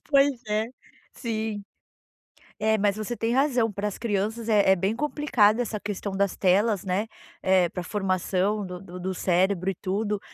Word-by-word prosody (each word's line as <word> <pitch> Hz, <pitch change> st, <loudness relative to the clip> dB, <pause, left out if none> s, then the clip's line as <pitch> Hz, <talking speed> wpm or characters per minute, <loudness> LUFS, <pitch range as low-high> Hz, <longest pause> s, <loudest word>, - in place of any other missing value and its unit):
pois 280 Hz, 0 st, +5 dB, 0.2 s
é, 215 Hz, +1 st, +1 dB, 0.5 s
sim. 220 Hz, -3 st, -3 dB, 1.0 s
É, 220 Hz, 0 st, +2 dB
mas 200 Hz, -1 st, +2 dB
você 215 Hz, +3 st, -4 dB
tem 230 Hz, +1 st, -1 dB
razão, 255 Hz, -5 st, +2 dB
pras 205 Hz, 0 st, -3 dB
crianças 220 Hz, +1 st, -2 dB
é 205 Hz, -3 st, +4 dB
é -, -, +4 dB
bem 195 Hz, +4 st, 0 dB
complicada 250 Hz, -6 st, +2 dB
essa 215 Hz, -3 st, -4 dB
questão 205 Hz, -1 st, -4 dB
das 195 Hz, 0 st, 0 dB
telas, 200 Hz, +1 st, +2 dB
né, 195 Hz, +4 st, -1 dB, 0.3 s
eh, 185 Hz, -2 st, +4 dB
para 180 Hz, -, -4 dB
a -, -, -7 dB
formação 195 Hz, +1 st, 0 dB
do 180 Hz, -1 st, -6 dB
do 180 Hz, -1 st, -9 dB
do 185 Hz, +1 st, -3 dB
cérebro 185 Hz, +1 st, +1 dB
e -, -, -3 dB
tudo, 205 Hz, +3 st, -2 dB
205 Hz, 170 wpm, -26 LUFS, 190-220 Hz, 1.0 s, pois